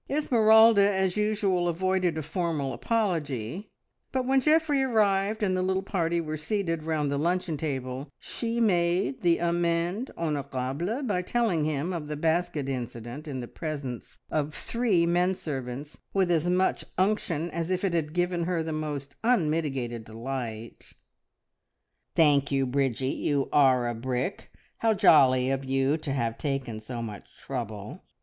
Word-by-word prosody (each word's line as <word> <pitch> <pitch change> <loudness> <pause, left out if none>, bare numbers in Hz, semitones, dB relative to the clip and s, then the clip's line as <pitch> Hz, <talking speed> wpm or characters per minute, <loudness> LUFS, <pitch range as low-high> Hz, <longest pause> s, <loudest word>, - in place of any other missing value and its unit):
Esmeralda 220 -7 +5
as 190 -2 0
usual 205 -4 +1
avoided 185 -1 0
a 155 - -2
formal 155 -4 -2
apology, 170 - -2 0.4
but 260 -1 -1
when 265 +1 +3
Geoffrey 305 -1 +3
arrived 215 -4 +2
and 190 -2 +2
the 185 - 0
little 190 +1 0
party 170 -3 0
were 155 -1 -3
seated 165 0 -2
round 155 -2 -1
the 140 - 0
luncheon 175 +1 0
table, 135 -2 -4
she 235 0 -3
made 185 +2 +1
the 170 -2 +3
amende 170 +6 0
honorable 150 - -2
by 200 -8 0
telling 180 -6 +1
him 155 +4 -1
of 160 -4 -4
the 150 - -3
basket 160 -1 0
incident 125 +2 -5
in 135 -3 -4
the 120 - -6
presence 140 -4 -6
of 150 -1 -1
three 225 -8 +1
men 175 +2 +2
servants 135 -2 -6 0.2
with 190 -2 +3
as 170 +1 +2
much 185 +1 +1
unction 180 -4 0
as 165 +1 -3
if 185 0 -1
it 185 - 0
had 155 -3 0
given 175 -1 0
her 175 -2 0
the 160 0 -3
most 145 -2 -4
unmitigated 150 - 0
delight. 115 0 -6 1.2
"Thank 145 -3 +4
you, 135 -1 +2
Bridgie, 130 -1 0
you 140 -2 -1
are 130 -4 +4
a 120 - -1
brick! 125 - -3 0.3
How 225 -1 +2
jolly 130 -7 +5
of 135 0 -1
you 135 +2 +1
to 155 -3 -5
have 115 -4 -1
taken 135 -6 -3
so 115 +2 -6
much 105 -3 -9
trouble! 105 - -6
160 Hz, 150 wpm, -27 LUFS, 135-190 Hz, 1.2 s, Esmeralda